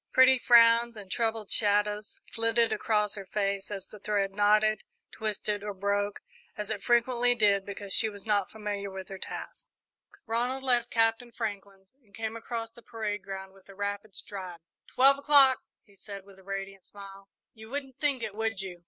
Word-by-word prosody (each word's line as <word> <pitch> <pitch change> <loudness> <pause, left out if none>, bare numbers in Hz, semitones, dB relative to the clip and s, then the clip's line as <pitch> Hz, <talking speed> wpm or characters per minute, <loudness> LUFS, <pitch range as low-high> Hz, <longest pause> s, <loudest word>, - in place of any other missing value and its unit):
Pretty 260 0 +7
frowns 235 -1 +5
and 195 -3 -10
troubled 225 -3 -1
shadows 210 0 +1
flitted 230 0 +2
across 210 -2 0
her 195 -2 -7
face 200 -1 -1
as 195 -2 -6
the 210 - -13
thread 200 -1 0
knotted, 210 +1 +3 0.3
twisted, 210 -1 -3
or 205 -1 -4
broke, 200 +1 -1 0.4
as 210 0 -4
it 210 -2 -3
frequently 245 0 +3
did, 200 -4 +2
because 200 -1 -6
she 220 - +3
was 205 -2 -12
not 205 -3 +1
familiar 205 -2 -4
with 190 -1 -8
her 195 -1 -7
task. - - -7 0.6
Ronald 245 +4 -1
left 245 -2 +1
Captain 225 +1 +1
Franklin's 200 -3 -6
and 205 -5 -19
came 225 0 -4
across 230 0 -5
the 235 - -16
parade 215 -3 -4
ground 190 0 -7
with 195 0 -21
a 195 - -12
rapid 205 0 -4
stride. 185 -4 -7 0.3
"Twelve 275 +2 +5
o'clock!" 280 -2 +6 0.2
he 200 - -24
said, 200 0 -9
with 195 -1 -17
a - - -18
radiant 195 0 -6
smile. 195 -1 -13 0.2
"You 220 0 -13
wouldn't 270 -1 -5
think 280 -5 +1
it, 215 -2 -4
would 225 -1 -2
you?" 185 -3 -5
210 Hz, 180 wpm, -29 LUFS, 200-230 Hz, 0.6 s, Pretty